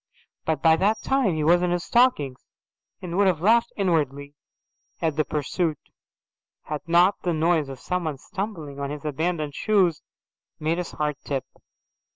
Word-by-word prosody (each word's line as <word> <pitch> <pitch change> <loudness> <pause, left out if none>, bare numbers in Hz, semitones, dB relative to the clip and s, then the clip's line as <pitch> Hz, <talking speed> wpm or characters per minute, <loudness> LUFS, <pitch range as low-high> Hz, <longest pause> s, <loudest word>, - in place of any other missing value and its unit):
But 160 -1 -1
by 160 -1 +6
that 205 +5 +1
time 265 -10 +2
he 155 - -1
was 175 +3 +4
in 180 - +1
his 175 0 -1
stockings 150 - +2 0.6
and 175 -1 -4
would 200 -1 +4
have 180 -5 +2
laughed 230 +6 +3
inwardly 145 -7 0 0.7
at 160 -3 0
the 155 - +2
pursuit 155 +2 -1 0.9
had 150 -1 -4
not 175 +4 +4
the 175 - 0
noise 160 -2 +1
of 135 -2 -8
someone 165 -4 -2
stumbling 170 -5 -6
on 140 0 -3
his 150 0 -7
abandoned 155 0 -2
shoes 185 -4 +2 0.6
made 160 +3 0
his 180 - -4
heart 150 -2 -2
trip. 135 -2 -3
165 Hz, 160 wpm, -25 LUFS, 150-180 Hz, 0.9 s, by